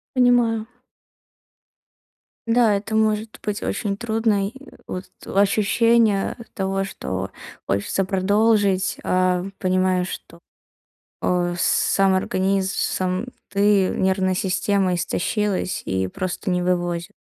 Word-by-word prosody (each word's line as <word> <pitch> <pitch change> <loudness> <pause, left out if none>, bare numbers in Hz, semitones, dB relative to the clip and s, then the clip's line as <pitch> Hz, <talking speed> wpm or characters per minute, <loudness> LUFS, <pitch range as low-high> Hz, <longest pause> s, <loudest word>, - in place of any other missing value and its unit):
Понимаю. 240 -3 +3 1.8
Да, 230 -2 +4
это 215 +2 -3
может 215 0 0
быть 210 0 -3
очень 200 -3 -2
трудно, 220 -3 0
и - - -20 0.3
вот 185 0 -5 0.2
ощущение 210 +1 +2 0.2
того, 195 0 -1
что 95 - -5 0.4
хочется 100 - 0
продолжить, 200 0 +2
а 185 0 +1
понимаешь, 185 -1 +1
что, 170 - -9 0.8
о 175 -1 +1
сам 190 +2 +2
организм, 190 +1 0
сам 185 +3 -1 0.2
ты, 200 -1 +3
нервная 190 0 +1
система 190 0 +1
истощилась 195 +2 -1
и 95 0 -1
просто 185 - -4
не 180 0 +1
вывозит. 175 0 -1
195 Hz, 100 wpm, -22 LUFS, 185-210 Hz, 1.8 s, Да